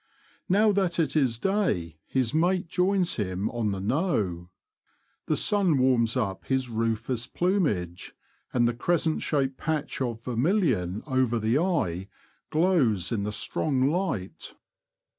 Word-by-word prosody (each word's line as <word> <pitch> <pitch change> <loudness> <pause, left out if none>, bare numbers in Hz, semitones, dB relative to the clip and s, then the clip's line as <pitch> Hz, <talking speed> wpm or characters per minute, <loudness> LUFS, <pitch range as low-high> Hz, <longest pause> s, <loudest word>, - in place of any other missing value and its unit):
Now 210 +3 +4
that 190 -4 0
it 165 -2 0
is 130 -7 +2
day 115 - -1
his 130 -1 0
mate 175 +3 +1
joins 185 0 +1
him 95 -2 -2
on 115 -4 -1
the 100 - -3
'^ - - -6
knowe." 105 - -1 0.8
The - - +1
sun 195 -8 +2
warms 125 -2 +2
up 100 -6 -2
his 130 -2 -1
rufus 115 +1 -2
plumage, 140 - -1 0.4
and 120 -2 +2
the 120 - 0
crescent 160 +5 0
shaped 135 -3 0
patch 155 -3 -3
of 120 -3 -3
vermilion 125 - 0
over 130 -4 +1
the 115 +5 +1
eye 100 - -1 0.4
glows 150 - +2
in 110 -4 0
the 105 - -2
strong 135 +4 0
light. 160 - -3
130 Hz, 140 wpm, -27 LUFS, 110-170 Hz, 0.8 s, Now